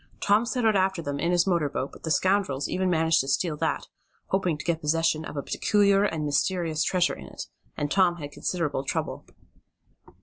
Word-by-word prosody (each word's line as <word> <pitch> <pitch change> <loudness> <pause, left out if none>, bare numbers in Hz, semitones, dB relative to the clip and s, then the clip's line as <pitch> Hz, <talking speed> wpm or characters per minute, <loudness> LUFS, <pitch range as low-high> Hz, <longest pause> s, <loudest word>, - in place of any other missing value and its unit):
Tom 210 +4 +2
set 245 0 -1
out 220 -2 +4
after 190 -1 +1
them 145 -1 -3
in 170 - 0
his 175 -1 +3
motor 170 -6 +1
boat, 135 -1 -3
but - - -14
the 160 - -4
scoundrels 185 -6 +1
even 185 0 0
managed 160 -1 +3
to 135 - -6
steal 150 +4 0
that, - - -1 0.4
hoping 185 -5 0
to - - -8
get 170 -1 0
possession 160 +1 +1
of 150 - -7
a 140 - -2
peculiar 200 -1 +2
and 160 -6 -2
mysterious 160 +2 0
treasure 180 -2 +1
in 65 - -9
it, - - -7 0.3
and 145 0 -2
Tom 185 -3 +3
had 145 -4 -8
considerable 150 -4 -2
trouble. - - -3
170 Hz, 200 wpm, -26 LUFS, 150-190 Hz, 0.4 s, out